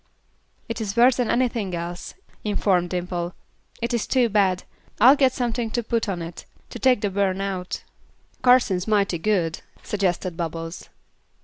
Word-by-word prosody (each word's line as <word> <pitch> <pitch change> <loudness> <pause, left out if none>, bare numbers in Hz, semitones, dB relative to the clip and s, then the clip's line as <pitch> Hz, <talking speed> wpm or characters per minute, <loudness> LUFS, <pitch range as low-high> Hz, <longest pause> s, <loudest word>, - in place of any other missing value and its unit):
"It 230 -1 -4
is 210 0 -4
worse 245 +1 +6
than 245 -3 0
anything 235 -7 0
else," 170 +1 -6 0.3
informed 195 -4 +1
Dimple. 175 -1 -3 0.5
"It 235 +1 -1
is 235 - 0
too 250 -3 +3
bad. 195 -3 +2 0.4
I'll 260 +4 +8
get 270 -3 +4
something 240 -2 -2
to 240 - 0
put 230 -1 -1
on 175 -3 -3
it, 165 0 -8 0.3
to 240 - -7
take 250 0 +3
the 205 - 0
burn 195 -1 0
out." 190 -2 -3 0.6
"Kar'sene's 245 -8 +4
mighty 200 -5 +2
good," 175 -4 0 0.2
suggested 185 -3 -1
Bubbles. 165 0 -5
200 Hz, 150 wpm, -24 LUFS, 180-235 Hz, 0.6 s, I'll